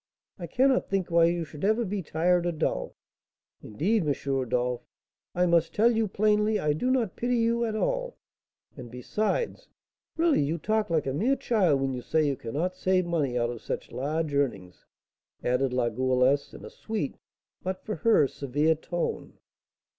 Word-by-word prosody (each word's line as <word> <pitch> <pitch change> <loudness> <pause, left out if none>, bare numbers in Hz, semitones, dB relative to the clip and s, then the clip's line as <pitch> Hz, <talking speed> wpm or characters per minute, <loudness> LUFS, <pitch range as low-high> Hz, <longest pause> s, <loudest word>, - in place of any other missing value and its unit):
I - - -5
cannot 260 +1 +2
think 190 -3 -1
why 170 0 +5
you 170 0 0
should 150 +1 -11
ever 220 +4 +2
be 200 0 -3
tired 175 +2 +1
or - - +1
dull. 155 - -2 0.7
Indeed, 195 - 0
M. 145 - +2 0.2
Rodolph, 125 -1 -1 0.5
I 180 +1 +3
must 170 -1 +2
tell 230 +3 +5
you 220 -1 +1
plainly 210 +2 +2
I 150 -4 +1
do 245 +12 -1
not 245 -7 +1
pity 245 +1 0
you 235 +1 +1
at 220 -1 -2
all; - - -1 0.6
and, 125 -4 -9
besides, 215 - -2 0.5
really 330 - +3
you 150 +4 0
talk 215 +4 0
like 160 -3 +1
a 135 - -1
mere 235 - +2
child 185 - +2
when 135 -1 0
you 125 - -4
say 155 +4 +1
you 140 -2 +1
cannot 150 +11 -3
save 185 -1 +1
money 150 -8 0
out 120 0 0
of 120 - -8
such - - -5
large 150 +3 -2
earnings," 100 -11 -2 0.6
added 125 +1 +1
La 125 -1 +1
Goualeuse, 130 +3 +1
in - - -11
a - - -10
sweet, 215 -11 -4 0.4
but, 185 0 -5
for 215 - -3
her, 225 - +4
severe 145 +4 0
tone. 170 +2 -4
170 Hz, 175 wpm, -27 LUFS, 135-215 Hz, 0.7 s, why